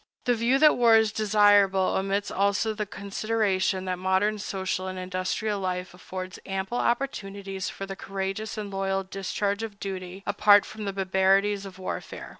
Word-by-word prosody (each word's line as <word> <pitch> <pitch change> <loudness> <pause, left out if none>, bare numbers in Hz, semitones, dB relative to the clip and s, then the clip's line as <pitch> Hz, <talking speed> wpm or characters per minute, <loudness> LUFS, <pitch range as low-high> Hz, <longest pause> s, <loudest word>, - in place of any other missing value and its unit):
The 245 - +3
view 235 +3 +2
that 305 +1 +5
war 235 -2 +6
is 220 -1 +4
desirable 205 -3 +4
omits 195 +1 -1
also 200 +3 +1
the 210 -1 -4
consideration 200 -2 -1
that 185 -1 -2
modern 190 +3 +1
social 190 -1 -3
and 185 0 -5
industrial 185 +3 -2
life 180 -1 -3
affords 185 +1 -7
ample 195 +5 -3
opportunities 195 -7 -2
for 195 - -6
the 195 0 -6
courageous 195 +3 -4
and 205 -2 -5
loyal 195 0 -1
discharge 200 +2 -2
of 215 -3 -6
duty, 190 -1 -6
apart 205 -1 +5
from 215 -1 -7
the 200 - -2
barbarities 195 +1 +2
of 190 - -12
warfare. 185 - -6
195 Hz, 160 wpm, -26 LUFS, 190-210 Hz, -, war